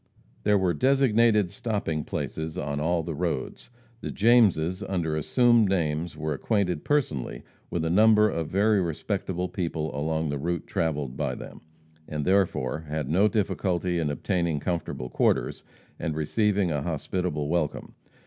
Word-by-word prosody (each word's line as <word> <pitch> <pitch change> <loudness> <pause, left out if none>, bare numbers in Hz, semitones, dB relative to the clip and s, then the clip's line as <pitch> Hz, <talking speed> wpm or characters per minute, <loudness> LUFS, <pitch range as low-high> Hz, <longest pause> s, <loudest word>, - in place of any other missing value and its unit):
There 105 0 +3
were 95 -2 +1
designated 115 - +3
stopping 105 - -2
places 80 0 -4
on 70 0 -2
all 85 +2 +1
the 80 +1 -4
roads. 75 - -3 0.3
The - - -5
Jameses 100 -6 +3
under 85 -6 -1
assumed 120 - +3
names 80 -3 -1
were 75 0 -2
acquainted 90 - 0
personally 75 - -1 0.3
with 80 -2 -2
a - - 0
number 105 +2 +6
of 85 -6 -2
very 100 +3 +2
respectable 90 +2 -2
people 80 -6 -3
along 80 +1 -1
the 70 -1 -2
route 85 +2 -2
travelled 75 -6 -2
by 70 -4 -1
them, - - -10 0.5
and 75 -1 -3
therefore 90 -7 +1
had 75 -2 -3
no 95 +6 +4
difficulty 90 -4 0
in 80 -3 0
obtaining 85 +1 -1
comfortable 80 -5 -3
quarters - - +1 0.4
and 80 -3 -2
receiving 100 +4 +1
a 75 -2 -1
hospitable 80 -1 -2
welcome. 80 -2 -2
85 Hz, 145 wpm, -26 LUFS, 75-100 Hz, 0.5 s, number